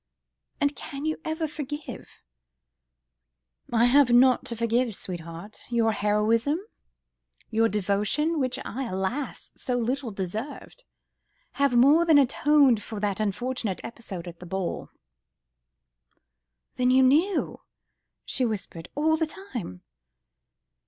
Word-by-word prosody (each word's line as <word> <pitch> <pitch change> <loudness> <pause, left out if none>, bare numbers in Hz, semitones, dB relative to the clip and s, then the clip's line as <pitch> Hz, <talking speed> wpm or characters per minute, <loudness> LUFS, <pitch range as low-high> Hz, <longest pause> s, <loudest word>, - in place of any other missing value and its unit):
"And 285 -1 +1
can 280 +2 -7
you 315 0 -2
ever 315 0 -2
forgive?" 295 0 -7 1.5
"I 235 0 +4
have 270 +1 +5
naught 250 +1 +5
to 235 - -4
forgive, 230 0 0
sweetheart; 170 +3 -7
your 230 -2 +2
heroism, 220 +7 +1 0.9
your 225 0 +3
devotion, 210 - 0
which 255 -1 0
I, 265 +3 -4
alas! 210 +7 -3
so 250 -1 -2
little 250 +2 -1
deserved, 220 - -6 0.8
have 280 -3 +3
more 285 +7 +6
than 325 -3 +5
atoned 275 -3 +4
for 215 -1 -6
that 200 -1 -1
unfortunate 215 0 -2
episode 195 -7 -8
at 170 -1 -9
the 180 - -10
ball." 190 0 -3 1.9
"Then 250 0 +2
you 260 +1 +5
knew?.. 320 +9 +2 0.3
." - - -56
she 260 - -1
whispered, 195 -7 -3
"all 315 +2 +2
the 320 0 0
time 240 - -7
245 Hz, 120 wpm, -26 LUFS, 210-285 Hz, 1.9 s, more